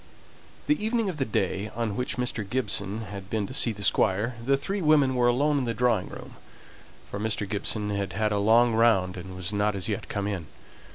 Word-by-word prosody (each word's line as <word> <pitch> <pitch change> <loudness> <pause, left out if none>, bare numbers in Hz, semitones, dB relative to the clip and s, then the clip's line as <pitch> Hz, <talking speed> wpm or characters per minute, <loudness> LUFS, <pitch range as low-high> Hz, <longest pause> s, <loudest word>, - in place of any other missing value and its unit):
The 300 -7 +1
evening 225 -1 +1
of 175 - -5
the 135 - 0
day 100 -1 -1
on 115 -3 -2
which 125 +3 -2
Mr. 125 -3 -1
Gibson 105 -2 -2
had 100 -2 -8
been 110 -2 -1
to 130 - -8
see 120 - +3
the 105 -2 -6
Squire, 105 +6 +2
the 135 +3 +3
three 195 +8 -3
women 150 -4 +4
were 125 -1 +3
alone 145 +4 +2
in 130 - -1
the 115 -1 -2
drawing 120 -6 +1
room, - - -10 0.7
for 100 - -4
Mr. 110 -1 -1
Gibson 105 +1 -2
had 100 -2 -2
had 105 +1 0
a 105 - +1
long 115 +3 +4
round 110 -5 +3
and 95 0 -8
was 90 +2 -3
not 105 0 +1
as 95 -3 -3
yet - - -3
come 100 -1 -2
in. 95 -6 -3
110 Hz, 215 wpm, -27 LUFS, 100-125 Hz, 0.7 s, women